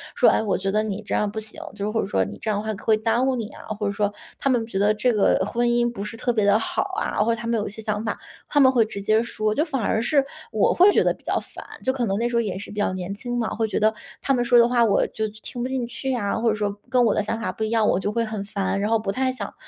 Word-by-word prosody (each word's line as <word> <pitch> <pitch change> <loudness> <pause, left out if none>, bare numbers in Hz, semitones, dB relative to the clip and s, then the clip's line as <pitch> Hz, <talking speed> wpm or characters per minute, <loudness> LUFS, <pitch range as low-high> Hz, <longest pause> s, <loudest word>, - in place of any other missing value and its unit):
说： - - +4
“哎， - - +2
我 200 - 0
觉 195 - -2
得 215 +1 +1
你 210 0 -3
这 205 - -3
样 210 - +1
不 220 - -4
行， 215 0 -10
“就 205 -1 -3
是 - - -1
或 225 - +1
者 - - -2
说， 195 - +1
“你 - - -9
这 215 - -2
样 205 - -1
的 220 - -7
话 220 - -1
会 220 -1 +4
耽 230 +3 +1
误 265 -1 +1
你 225 -3 -3
啊”， - - -12 0.2
或 210 - -1
者 200 - +1
说 205 0 0 0.2
他 275 - 0
们 240 -3 +2
觉 195 - -4
得 205 +2 +3
这 235 +3 +1
个 210 - +3
婚 240 +2 0
姻 240 0 +2
不 200 -4 -6
是 210 +2 -6
特 245 0 0
别 215 -3 +1
地 205 +1 +5
好 225 - -1 0.2
啊， 210 - 0
或 230 +1 +2
者 230 - -5
他 230 - -5
们 230 -1 +1
有 205 - -2
一 - - -6
些 220 - -9
想 210 0 -2
法， 225 - -3 0.3
他 290 - +2
们 260 -2 +7
会 240 -3 +4
直 200 -2 -7
接 215 +3 +2
说。 215 -2 -1
就 305 - +2
反 270 -7 -2
而 220 +2 +1
是 275 +2 +2 0.3
我 215 -3 +3
会 380 +3 +6
觉 - - +3
得 - - +2
比 - - -22
较 - - 0
烦， - - -11 0.2
就 260 - +2
可 245 -3 -1
能 195 -1 0
那 235 - +1
时 240 - -3
候 235 - +4
也 200 -4 -3
是 - - -9
比 210 - -5
较 205 - +1
年 185 +1 -4
轻 245 +3 -4
嘛， 230 - 0
会 225 0 0
觉 - - -1
得 215 +1 +3 0.3
他 275 - +1
们 245 -1 +1
说 240 0 +5
的 235 - +6
话 240 -1 +3
我 205 -3 +3
就 220 - -3 0.2
听 245 - -6
不 255 - -2
进 255 -3 -2
去 265 +2 -3
啊， 205 -5 -1
或 230 0 +2
者 215 - +1
说 205 -1 -2
跟 250 -1 +4
我 210 - +3
的 - - +1
想 225 +2 -2
法 230 - -2
不 220 - -5
一 215 - -1
样， 225 -2 +2
我 185 - +2
就 205 - -2
会 230 0 0
很 215 -2 -4
烦， 195 -1 -2
然 210 - 0
后 225 -1 +3
不 200 -2 -2
太 260 +4 0
想 210 -6 -6
220 Hz, 360 characters per minute, -23 LUFS, 210-240 Hz, 0.3 s, 们